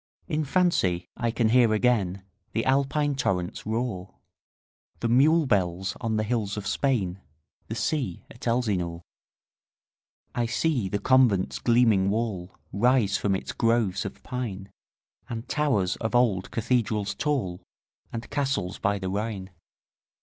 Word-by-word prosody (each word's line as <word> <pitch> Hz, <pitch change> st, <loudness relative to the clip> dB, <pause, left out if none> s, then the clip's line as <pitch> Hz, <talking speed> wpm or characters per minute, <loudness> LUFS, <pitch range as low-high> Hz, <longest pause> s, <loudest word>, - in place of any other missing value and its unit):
In 155 Hz, 0 st, -1 dB
fancy 135 Hz, -, +1 dB
I 120 Hz, -, -1 dB
can 115 Hz, -1 st, +1 dB
hear 115 Hz, -2 st, +5 dB
again 100 Hz, -5 st, +1 dB, 0.3 s
The 115 Hz, -, 0 dB
Alpine 140 Hz, +2 st, +2 dB
torrent's 95 Hz, -11 st, -2 dB
roar, 110 Hz, -5 st, -3 dB, 0.8 s
The 115 Hz, -, 0 dB
mule 150 Hz, +7 st, +4 dB
bells 95 Hz, -4 st, 0 dB
on 110 Hz, -1 st, 0 dB
the 110 Hz, -, +1 dB
hills 110 Hz, -3 st, -1 dB
of 105 Hz, -, -4 dB
Spain, 105 Hz, -9 st, 0 dB
15 95 Hz, -, -30 dB, 0.4 s
The 110 Hz, -, -4 dB
sea 115 Hz, -, -2 dB
at 120 Hz, -, -8 dB
Elsinore. 95 Hz, -8 st, 0 dB, 1.3 s
I 120 Hz, -1 st, 0 dB
see 125 Hz, -5 st, 0 dB
the 100 Hz, -, 0 dB
convent's 120 Hz, -6 st, +3 dB
gleaming 115 Hz, -5 st, +4 dB
wall 100 Hz, -4 st, -2 dB, 0.2 s
Rise 115 Hz, -1 st, +3 dB
from 100 Hz, -2 st, +1 dB
its -, -, -4 dB
groves 115 Hz, -4 st, +1 dB
of 100 Hz, -, -8 dB
pine, 100 Hz, -6 st, -5 dB, 0.6 s
And 115 Hz, +1 st, -5 dB
towers 125 Hz, -12 st, +1 dB
of 115 Hz, +1 st, -2 dB
old 110 Hz, -7 st, +2 dB
cathedrals 110 Hz, -3 st, 0 dB
tall, 100 Hz, -8 st, -1 dB, 0.5 s
And 115 Hz, 0 st, -5 dB
castles 135 Hz, -10 st, -1 dB
by 100 Hz, +1 st, +1 dB
the 95 Hz, -1 st, -4 dB
Rhine. 100 Hz, -1 st, -3 dB
110 Hz, 135 wpm, -26 LUFS, 95-125 Hz, 1.3 s, hear